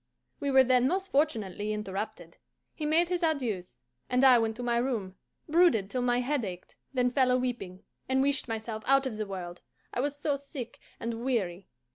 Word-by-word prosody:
We 285 Hz, -, -1 dB
were 265 Hz, -1 st, +7 dB
then 255 Hz, 0 st, +4 dB
most 380 Hz, +5 st, -1 dB
fortunately 215 Hz, -, 0 dB
interrupted. 200 Hz, -4 st, -5 dB, 0.4 s
He 305 Hz, -, -3 dB
made 335 Hz, +3 st, +3 dB
his 360 Hz, 0 st, -1 dB
adieus, 245 Hz, -, -1 dB, 0.3 s
and 250 Hz, +1 st, +2 dB
I 255 Hz, -3 st, +8 dB
went 225 Hz, -1 st, 0 dB
to 245 Hz, -, -6 dB
my 240 Hz, -1 st, +1 dB
room, 235 Hz, -7 st, -1 dB, 0.3 s
brooded 310 Hz, -, +3 dB
till 255 Hz, -, -1 dB
my 245 Hz, 0 st, +2 dB
head 270 Hz, 0 st, 0 dB
ached, 180 Hz, -3 st, -7 dB, 0.2 s
then 250 Hz, -2 st, +1 dB
fell 260 Hz, -1 st, +3 dB
a 250 Hz, -, +4 dB
weeping, 235 Hz, -8 st, -4 dB, 0.3 s
and 265 Hz, 0 st, +3 dB
wished 280 Hz, -1 st, +1 dB
myself 220 Hz, -1 st, -4 dB
out 275 Hz, 0 st, +4 dB
of 240 Hz, -5 st, -3 dB
the 215 Hz, -1 st, -3 dB
world, 180 Hz, -2 st, -6 dB, 0.3 s
I -, -, -2 dB
was 285 Hz, +2 st, -1 dB
so 290 Hz, -1 st, 0 dB
sick 275 Hz, -4 st, -8 dB, 0.2 s
and 230 Hz, 0 st, -4 dB
weary. 195 Hz, -8 st, -1 dB
245 Hz, 190 wpm, -29 LUFS, 215-275 Hz, 0.4 s, I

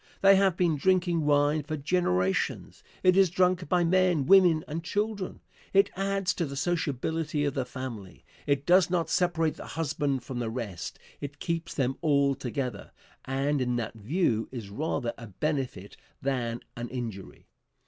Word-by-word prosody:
They 195 Hz, 0 st, +7 dB
have 190 Hz, -2 st, +3 dB
been 170 Hz, -4 st, +2 dB
drinking 175 Hz, -2 st, +2 dB
wine 145 Hz, +1 st, +3 dB
for 155 Hz, +2 st, -4 dB
generations. 135 Hz, -, 0 dB, 0.2 s
It 185 Hz, 0 st, +5 dB
is 195 Hz, -2 st, +5 dB
drunk 180 Hz, -1 st, +1 dB
by 180 Hz, -1 st, +3 dB
men, 175 Hz, -4 st, +3 dB
women 175 Hz, -3 st, +6 dB
and 160 Hz, +2 st, -4 dB
children. 205 Hz, +1 st, -2 dB, 0.3 s
It 195 Hz, +1 st, +4 dB
adds 195 Hz, 0 st, 0 dB
to 170 Hz, -, -2 dB
the 140 Hz, -, -6 dB
sociability 160 Hz, -1 st, -1 dB
of 145 Hz, -, 0 dB
the 130 Hz, -2 st, -1 dB
family. 125 Hz, -7 st, -8 dB, 0.2 s
It 140 Hz, -1 st, +1 dB
does 180 Hz, +1 st, +5 dB
not 170 Hz, -3 st, 0 dB
separate 170 Hz, -3 st, +1 dB
the -, -, -9 dB
husband 145 Hz, -4 st, -1 dB
from 130 Hz, -3 st, -5 dB
the 115 Hz, -2 st, -2 dB
rest, 110 Hz, -7 st, -5 dB, 0.2 s
it 145 Hz, 0 st, -7 dB
keeps 165 Hz, -1 st, -3 dB
them 135 Hz, -1 st, 0 dB
all 140 Hz, -2 st, +3 dB
together, 125 Hz, -4 st, -4 dB, 0.3 s
and 135 Hz, +2 st, 0 dB
in 125 Hz, -1 st, 0 dB
that 115 Hz, -3 st, -3 dB
view 115 Hz, -, 0 dB
is 115 Hz, -6 st, -7 dB
rather 135 Hz, -1 st, -2 dB
a 115 Hz, -, -8 dB
benefit 125 Hz, -, -3 dB, 0.2 s
than 120 Hz, -4 st, -2 dB
an 120 Hz, 0 st, -5 dB
injury. 115 Hz, -6 st, -6 dB
145 Hz, 160 wpm, -28 LUFS, 125-175 Hz, 0.3 s, They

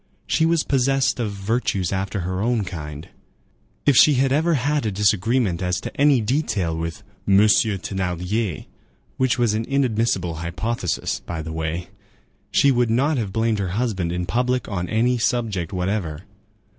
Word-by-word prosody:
She 160 Hz, 0 st, +2 dB
was 165 Hz, -1 st, +2 dB
possessed 135 Hz, -1 st, +1 dB
of 115 Hz, -3 st, -1 dB
virtues 100 Hz, -2 st, -1 dB
after 95 Hz, +1 st, -2 dB
her 90 Hz, +2 st, -3 dB
own 115 Hz, -1 st, +1 dB
kind; 75 Hz, -4 st, -7 dB, 0.8 s
if 145 Hz, -, +4 dB
she 150 Hz, +4 st, +7 dB
had 135 Hz, +1 st, +2 dB
ever 160 Hz, +4 st, +2 dB
had 145 Hz, +3 st, 0 dB
a 110 Hz, -, -1 dB
disagreement 105 Hz, 0 st, +1 dB
as 90 Hz, 0 st, 0 dB
to -, -, -7 dB
any 140 Hz, -3 st, +4 dB
detail 105 Hz, -, 0 dB
with 85 Hz, 0 st, -5 dB, 0.2 s
"Monsieur 105 Hz, +1 st, +4 dB
Thénardier,"—which 95 Hz, -, -3 dB
was 120 Hz, -3 st, +2 dB
an 110 Hz, +1 st, -1 dB
inadmissible 115 Hz, -, 0 dB
hypothesis, 90 Hz, +2 st, -2 dB
by 80 Hz, -2 st, -6 dB
the 80 Hz, 0 st, -6 dB
way,—she 80 Hz, -, -2 dB
would 120 Hz, -2 st, +2 dB
not 135 Hz, +5 st, +2 dB
have 105 Hz, -4 st, -3 dB
blamed 110 Hz, 0 st, 0 dB
her 95 Hz, 0 st, -2 dB
husband 100 Hz, -8 st, -1 dB
in 90 Hz, 0 st, -2 dB
public 125 Hz, +6 st, 0 dB
on 90 Hz, -4 st, -3 dB
any 120 Hz, +2 st, +1 dB
subject 110 Hz, -8 st, -1 dB
whatever. 90 Hz, -4 st, -2 dB
105 Hz, 150 wpm, -22 LUFS, 90-125 Hz, 0.8 s, she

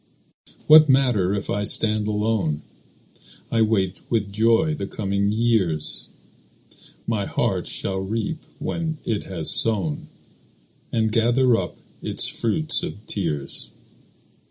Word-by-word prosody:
What 155 Hz, -1 st, +8 dB
matter 120 Hz, -8 st, +2 dB
if 100 Hz, -, -4 dB
I 105 Hz, -, -1 dB
stand 105 Hz, 0 st, +4 dB
alone? 105 Hz, -8 st, -1 dB, 0.9 s
I 115 Hz, -, +2 dB
wait 95 Hz, -4 st, 0 dB
with 105 Hz, -4 st, -1 dB
joy 115 Hz, +9 st, +2 dB
the 100 Hz, -10 st, -5 dB
coming 100 Hz, 0 st, -1 dB
years; 105 Hz, -9 st, 0 dB, 1.0 s
My 110 Hz, -4 st, -1 dB
heart -, -, -1 dB
shall 95 Hz, -1 st, -1 dB
reap 115 Hz, -, -3 dB, 0.2 s
when 160 Hz, -2 st, -3 dB
it 110 Hz, -3 st, -2 dB
has 85 Hz, -5 st, +2 dB
sown, 95 Hz, -10 st, +2 dB, 0.8 s
And 110 Hz, -1 st, 0 dB
gather 120 Hz, +2 st, +3 dB
up -, -, -3 dB, 0.2 s
its -, -, +1 dB
fruit 155 Hz, +8 st, -1 dB
of 105 Hz, +2 st, -7 dB
tears. 75 Hz, -8 st, -3 dB
110 Hz, 115 wpm, -22 LUFS, 95-115 Hz, 1.0 s, What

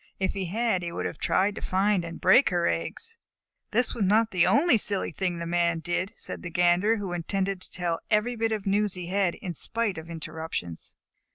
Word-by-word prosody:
If 190 Hz, -1 st, 0 dB
he 195 Hz, -1 st, -3 dB
had, 215 Hz, +1 st, 0 dB
he 170 Hz, -1 st, -4 dB
would -, -, -4 dB
have -, -, -4 dB
tried 200 Hz, +2 st, +2 dB
to -, -, -8 dB
find 195 Hz, 0 st, +1 dB
and 170 Hz, 0 st, -7 dB
break 190 Hz, +9 st, +6 dB
her 175 Hz, -1 st, 0 dB
eggs. 460 Hz, 0 st, -2 dB, 0.5 s
"That 245 Hz, +3 st, +3 dB
was 230 Hz, -, -1 dB
not 215 Hz, +3 st, +3 dB
the 180 Hz, -3 st, +3 dB
only 315 Hz, 0 st, +5 dB
silly 200 Hz, -3 st, +2 dB
thing 180 Hz, -2 st, -2 dB
the 170 Hz, -, -4 dB
Man 170 Hz, 0 st, +1 dB
did," 175 Hz, +4 st, -2 dB
said -, -, -5 dB
the 175 Hz, -, -6 dB
Gander, 175 Hz, +6 st, +3 dB
who 195 Hz, -4 st, -4 dB
intended 190 Hz, +2 st, -2 dB
to -, -, -7 dB
tell 170 Hz, -2 st, -2 dB
every 220 Hz, +3 st, +2 dB
bit 225 Hz, 0 st, 0 dB
of 215 Hz, -3 st, -2 dB
news 205 Hz, 0 st, +1 dB
he 180 Hz, -1 st, -6 dB
had, 190 Hz, -2 st, +1 dB
in 180 Hz, -, -6 dB
spite 215 Hz, +2 st, -1 dB
of 160 Hz, +1 st, -11 dB
interruptions. 160 Hz, -, -5 dB
190 Hz, 210 wpm, -27 LUFS, 175-210 Hz, 0.5 s, break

